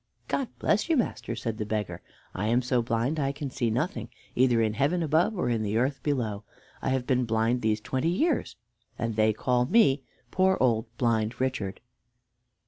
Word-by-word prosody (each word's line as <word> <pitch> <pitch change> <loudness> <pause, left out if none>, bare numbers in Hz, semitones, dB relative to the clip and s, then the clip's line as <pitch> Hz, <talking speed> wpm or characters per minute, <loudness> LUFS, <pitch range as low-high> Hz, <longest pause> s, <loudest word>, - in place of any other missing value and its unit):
"God 270 - -1
bless 210 - +1
you, 325 - +3
master!" 240 - -2
said 115 -1 -4
the - - 0
beggar, 105 -2 -3 0.3
"I 105 +3 -2
am 120 +3 +2
so 125 0 +1
blind 115 +6 -1
I 135 -1 +1
can 140 -1 -5
see 120 -3 0
nothing, 120 - -2 0.2
either 125 -2 +3
in 110 -1 +2
heaven 145 +9 +1
above 165 +7 +2
or - - 0
in 115 -2 +1
the 105 +1 -1
earth 135 +2 0
below. 115 -8 -1 0.4
I - - -1
have 130 -1 0
been 125 -2 +1
blind 115 +2 +1
these 110 -1 +1
twenty 130 +8 -1
years, 290 - 0 0.4
and 115 -2 -2
they 110 0 +4
call 125 +3 +1
me 165 - +4 0.3
'poor 190 0 +3
old 115 -3 +2
blind 115 -2 0
Richard.'" 125 -7 -2
125 Hz, 185 wpm, -27 LUFS, 110-140 Hz, 0.4 s, they